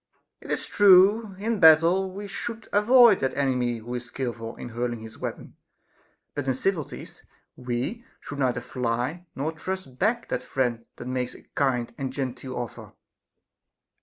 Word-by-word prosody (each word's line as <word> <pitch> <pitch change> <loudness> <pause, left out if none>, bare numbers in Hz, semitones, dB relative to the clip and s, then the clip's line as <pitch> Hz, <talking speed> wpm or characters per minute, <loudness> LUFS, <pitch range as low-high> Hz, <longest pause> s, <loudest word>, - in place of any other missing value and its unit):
It - - -12
is - - -1
true, 200 +1 +5
in 220 +4 -1
a - - -1
battle 170 +3 +6
we 200 +2 -7
should 225 +3 -6
avoid 230 +1 +6
that 130 -1 -1
enemy 125 -4 +1
who 115 +2 -7
is 125 0 -4
skilful 120 -3 -5
in - - -8
hurling 120 0 -3
his 110 0 -11
weapon; - - -6 0.8
but 145 -2 -4
in 130 - +1
civilities 160 0 -3 0.3
we 125 - -3 0.2
should 145 - -8
neither 125 -2 +1
fly 125 +9 -3
nor 155 +4 -2
thrust 160 -7 -6
back 235 +2 +1
that - - -1
friend 120 -3 -1
that - - -9
makes 125 -1 -2
a - - -15
kind 125 -4 0
and 135 -1 -2
genteel 130 -1 -4
offer. 120 -3 -6
135 Hz, 160 wpm, -26 LUFS, 125-190 Hz, 0.8 s, battle